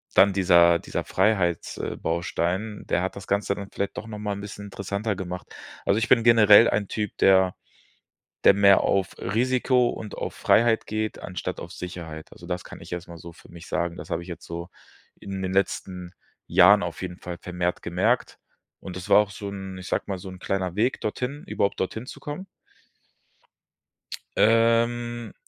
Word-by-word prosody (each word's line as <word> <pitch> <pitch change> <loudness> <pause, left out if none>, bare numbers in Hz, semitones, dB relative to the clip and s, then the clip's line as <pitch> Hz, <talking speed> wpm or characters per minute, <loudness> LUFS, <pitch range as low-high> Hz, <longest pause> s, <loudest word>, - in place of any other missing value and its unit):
dann 100 0 +6
dieser 85 -3 +5
dieser - - -4
Freiheits 95 -4 +1
äh, - - -4
Baustein, 85 +5 -2
der 90 - 0
hat 95 - -3
das 100 - -8
Ganze 100 0 0
dann 100 -1 -7
vielleicht 100 - -3
doch - - -5
noch 105 -1 -7
mal 105 -1 -2
'n 100 - -6
bisschen 100 0 -8
interessanter 100 +2 -3
gemacht. 90 -1 -6 0.4
Also 100 - +3
ich 115 - 0
bin 115 -2 +5
generell 115 -1 +7
ein 100 -2 0
Typ, 105 -2 -4
der 95 -1 +4 0.9
der - - +8
mehr 100 -1 +6
auf 95 -2 0
Risiko 125 +4 +2
und 105 - -7
auf - - -4
Freiheit 115 0 +3
geht, 110 0 -3
anstatt 90 -2 -5
auf - - -8
Sicherheit. 85 -3 -7
Also 85 - -13
das 90 0 -3
kann - - -11
ich - - -12
erst 90 0 -5
mal 85 -1 -10
so 85 +1 -10
für - - -18
mich 85 0 -12
sagen. 85 0 -2
Das - - -9
habe 85 - -2
ich 85 - -12
jetzt 85 - -8
so 85 +1 -6 0.5
in 95 -1 -5
den 95 0 -2
letzten 90 -2 -2 0.3
Jahren 100 +3 +6
auf 85 +1 -6
jeden 90 0 -6
Fall 90 -1 -7
vermehrt 90 0 -2
gemerkt. 95 +9 0 0.4
Und 95 - -8
das 90 - -7
war - - +7
auch 105 -1 +2
so 100 0 -7
'n 95 -1 -7
ich 95 - -8
sage - - -1
mal, 95 -2 -3
so 95 - -9
'n 95 - -10
kleiner 95 -1 -2
Weg 120 +5 +1
dorthin, 125 +7 -3
überhaupt 100 - -1
dorthin 110 +6 -3
zu - - -10
kommen. 150 +6 -6 1.9
Ähm, 115 0 +2
100 Hz, 190 wpm, -25 LUFS, 90-110 Hz, 1.9 s, der